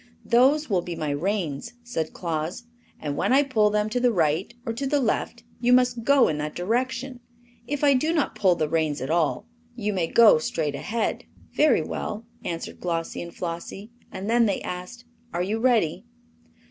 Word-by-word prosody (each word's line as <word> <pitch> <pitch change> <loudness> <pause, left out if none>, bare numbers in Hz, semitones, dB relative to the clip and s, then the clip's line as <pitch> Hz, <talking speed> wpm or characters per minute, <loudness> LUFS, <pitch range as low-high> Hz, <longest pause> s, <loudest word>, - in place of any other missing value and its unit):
"Those 275 +6 +4
will 190 -5 +1
be 175 0 -6
my 155 -2 -2
reins," 175 +4 -2
said 165 -10 -3
Claus, 165 +3 -3 0.4
"and 145 -2 -3
when - - 0
I 275 +2 +5
pull 220 -7 +2
them 210 0 +1
to 245 - 0
the 245 0 +3
right 165 0 +1
or 230 - -2
to 270 +4 -3
the 290 +1 +2
left 255 - -1 0.2
you 245 0 +2
must 250 -2 +3
go 280 0 +5
in 150 -1 -1
that 150 0 -4
direction. 250 +6 -2 0.5
If 290 +1 -3
I 285 -1 +6
do 305 +5 +1
not 315 -5 0
pull 185 -3 +3
the 155 -2 0
reins 155 -2 0
at 130 +4 -3
all 170 +4 +1 0.3
you 210 -3 -2
may 180 -4 0
go 220 -4 +6
straight 155 -1 -2
ahead." 210 +12 -2 0.3
"Very 300 -5 +4
well," 215 +2 -5 0.2
answered 165 -1 -5
Glossie 165 -2 -3
and 170 - -7
Flossie; 175 +6 -6 0.2
and 195 - -6
then 235 0 +4
they 200 - 0
asked: 180 +7 -7 0.3
"Are 175 - +1
you 210 +4 -1
ready?" 230 -10 +2
210 Hz, 185 wpm, -25 LUFS, 165-245 Hz, 0.5 s, I